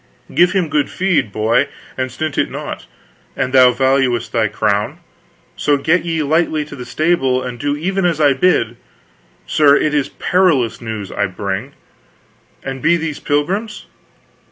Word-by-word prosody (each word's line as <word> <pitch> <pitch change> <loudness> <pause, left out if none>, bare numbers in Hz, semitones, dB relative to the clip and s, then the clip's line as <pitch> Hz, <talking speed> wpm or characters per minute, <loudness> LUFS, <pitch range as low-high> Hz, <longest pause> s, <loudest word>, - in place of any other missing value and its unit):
Give 175 +1 +4
him 185 -4 +1
good 150 -1 0
feed, 185 - 0
boy, 110 +7 +1 0.3
and 130 -1 -3
stint 155 +3 -4
it - - 0
not, - - -7 0.5
an 130 - -1
thou 130 -1 +6
valuest 130 -2 +1
thy 115 -2 +1
crown; 105 - -1 0.6
so 145 -1 +1
get 165 +6 +1
ye 165 -2 -1
lightly 155 0 +1
to 150 - -10
the 125 -2 -8
stable 130 -2 +1
and 125 -1 -6
do 145 +2 -1
even 190 +5 -1
as 170 -3 +1
I 145 -2 +4
bid.... 125 -6 +1 0.7
Sir, 140 - +4
it 150 0 +1
is 145 -2 0
parlous 165 -11 +1
news 110 -4 -5
I 100 - -1
bring, 95 +1 -4 0.9
and 135 -1 -5
be 170 +5 +3
these 160 -3 -4
pilgrims? 195 +10 -2
140 Hz, 155 wpm, -17 LUFS, 120-165 Hz, 0.9 s, thou